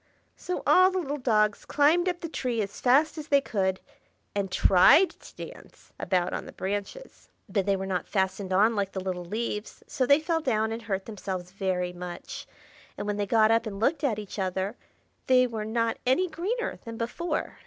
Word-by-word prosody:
So 360 Hz, -, -4 dB
all 370 Hz, +1 st, +6 dB
the 375 Hz, -, -3 dB
little 295 Hz, -4 st, -2 dB
dogs 215 Hz, -4 st, +2 dB
climbed 325 Hz, +5 st, +3 dB
up 355 Hz, -1 st, -4 dB
the 335 Hz, -, -3 dB
tree 250 Hz, -7 st, -2 dB
as 200 Hz, 0 st, -8 dB
fast 285 Hz, +6 st, +3 dB
as 300 Hz, -, -7 dB
they 280 Hz, -2 st, +5 dB
could, 190 Hz, -8 st, -1 dB, 0.5 s
and 200 Hz, -2 st, -2 dB
tried 235 Hz, -, +6 dB
to -, -, -10 dB
dance -, -, -15 dB
about 180 Hz, -1 st, 0 dB
on -, -, -4 dB
the -, -, -8 dB
branches. 205 Hz, -, -5 dB, 0.2 s
But 200 Hz, -3 st, -1 dB
they 200 Hz, -, +3 dB
were 190 Hz, 0 st, -4 dB
not 185 Hz, -2 st, -2 dB
fastened 190 Hz, -1 st, -1 dB
on 210 Hz, +5 st, +4 dB
like 200 Hz, -1 st, -1 dB
the 190 Hz, -, -3 dB
little 185 Hz, -1 st, -3 dB
leaves, 210 Hz, +3 st, -4 dB
so 255 Hz, -, -1 dB
they 280 Hz, +1 st, +6 dB
fell 325 Hz, +1 st, -1 dB
down 220 Hz, -6 st, 0 dB
and 225 Hz, +1 st, -4 dB
hurt 195 Hz, -4 st, -3 dB
themselves 185 Hz, -4 st, -5 dB
very 185 Hz, -2 st, -2 dB
much; 175 Hz, 0 st, -7 dB, 0.5 s
and -, -, -4 dB
when 205 Hz, 0 st, -2 dB
they 205 Hz, -1 st, -1 dB
got 220 Hz, +1 st, +4 dB
up 230 Hz, 0 st, +2 dB
and 200 Hz, -2 st, -6 dB
looked 280 Hz, +7 st, +1 dB
at 240 Hz, -7 st, +1 dB
each 210 Hz, -1 st, -7 dB
other, 190 Hz, +3 st, -2 dB, 0.5 s
they 255 Hz, -1 st, +5 dB
were 225 Hz, -3 st, -4 dB
not 230 Hz, +1 st, 0 dB
any 315 Hz, +9 st, +3 dB
greener 405 Hz, +9 st, -3 dB
than 230 Hz, -1 st, -7 dB
before. 240 Hz, +10 st, -3 dB
220 Hz, 195 wpm, -27 LUFS, 195-280 Hz, 0.5 s, all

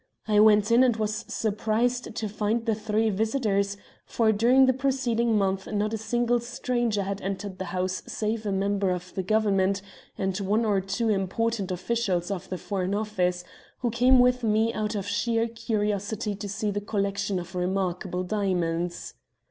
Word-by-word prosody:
I 210 Hz, -1 st, +4 dB
went 210 Hz, 0 st, +5 dB
in 240 Hz, +2 st, +6 dB
and 245 Hz, -3 st, +3 dB
was 220 Hz, +1 st, -2 dB
surprised 225 Hz, +3 st, -1 dB
to 220 Hz, -, -2 dB
find 215 Hz, +2 st, -1 dB
the 225 Hz, -, +2 dB
three 215 Hz, +1 st, 0 dB
visitors, 200 Hz, -2 st, 0 dB, 0.3 s
for 225 Hz, -2 st, +2 dB
during 240 Hz, +5 st, +5 dB
the 260 Hz, -, +4 dB
preceding 245 Hz, -4 st, +1 dB
month 195 Hz, -1 st, 0 dB
not 210 Hz, +1 st, 0 dB
a -, -, 0 dB
single 240 Hz, +2 st, +1 dB
stranger 240 Hz, -3 st, -1 dB
had 195 Hz, +1 st, -4 dB
entered 195 Hz, 0 st, -4 dB
the 190 Hz, -, -3 dB
house 185 Hz, +1 st, -2 dB
save 215 Hz, 0 st, -2 dB
a -, -, 0 dB
member 195 Hz, 0 st, 0 dB
of 180 Hz, 0 st, -4 dB
the 190 Hz, -, -2 dB
Government 195 Hz, -1 st, +1 dB, 0.3 s
and 190 Hz, -1 st, -1 dB
one 210 Hz, +4 st, +1 dB
or 200 Hz, -3 st, +2 dB
two 200 Hz, +4 st, -1 dB
important 205 Hz, +1 st, 0 dB
officials 185 Hz, -1 st, -1 dB
of 190 Hz, -3 st, -5 dB
the 185 Hz, -, -3 dB
Foreign 190 Hz, 0 st, -2 dB
Office, 180 Hz, -4 st, -1 dB, 0.4 s
who 240 Hz, -2 st, 0 dB
came 250 Hz, +3 st, +5 dB
with 250 Hz, 0 st, +4 dB
me 220 Hz, +1 st, +2 dB
out 215 Hz, 0 st, -2 dB
of 200 Hz, -2 st, -2 dB
sheer 230 Hz, +2 st, 0 dB
curiosity 210 Hz, -1 st, -2 dB
to 205 Hz, 0 st, -6 dB
see 210 Hz, +1 st, -2 dB
a 205 Hz, 0 st, -2 dB
collection 200 Hz, -1 st, -1 dB
of 175 Hz, 0 st, -6 dB
remarkable 180 Hz, 0 st, -1 dB
diamonds. 175 Hz, -4 st, -1 dB
210 Hz, 170 wpm, -26 LUFS, 195-225 Hz, 0.4 s, in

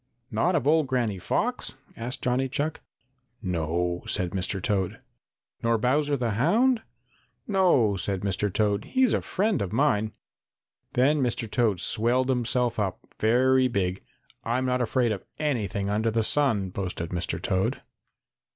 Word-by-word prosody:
"Not 145 Hz, +12 st, +1 dB
of 145 Hz, -6 st, 0 dB
old 155 Hz, 0 st, +3 dB
Granny 120 Hz, -7 st, 0 dB
Fox?" -, -, -1 dB, 0.2 s
asked 125 Hz, +3 st, -4 dB
Johnny 130 Hz, +1 st, +1 dB
Chuck. 150 Hz, +4 st, -2 dB, 0.6 s
"No," 85 Hz, 0 st, -1 dB
said 90 Hz, -2 st, -1 dB
Mr. 95 Hz, +1 st, -2 dB
Toad. 95 Hz, -1 st, -1 dB, 0.6 s
"Nor 115 Hz, 0 st, +2 dB
Bowser 145 Hz, +5 st, +1 dB
the 120 Hz, -3 st, -1 dB
Hound?" 220 Hz, -, +3 dB, 0.7 s
"No," 175 Hz, -, +3 dB
said 95 Hz, 0 st, -2 dB
Mr. 100 Hz, +1 st, -1 dB
Toad. 105 Hz, 0 st, 0 dB
"He's 260 Hz, -4 st, +2 dB
a -, -, +1 dB
friend 205 Hz, 0 st, 0 dB
of 95 Hz, -2 st, -3 dB
mine." 110 Hz, -4 st, +1 dB, 0.8 s
Then 140 Hz, +4 st, +3 dB
Mr. 120 Hz, -2 st, -1 dB
Toad 110 Hz, -4 st, +1 dB
swelled 125 Hz, +4 st, +2 dB
himself 125 Hz, -1 st, +1 dB
up 95 Hz, -3 st, -1 dB, 0.2 s
very 130 Hz, +3 st, +4 dB
big. 95 Hz, -5 st, -1 dB, 0.4 s
"I'm 125 Hz, +3 st, 0 dB
not 125 Hz, 0 st, +1 dB
afraid 120 Hz, 0 st, +1 dB
of 100 Hz, -, -3 dB
anything 105 Hz, -10 st, -1 dB
under 105 Hz, +3 st, +1 dB
the 115 Hz, 0 st, +1 dB
sun," 110 Hz, -7 st, +2 dB
boasted 90 Hz, -3 st, -4 dB
Mr. 90 Hz, 0 st, -2 dB
Toad. 95 Hz, -6 st, 0 dB
115 Hz, 140 wpm, -26 LUFS, 100-130 Hz, 0.8 s, very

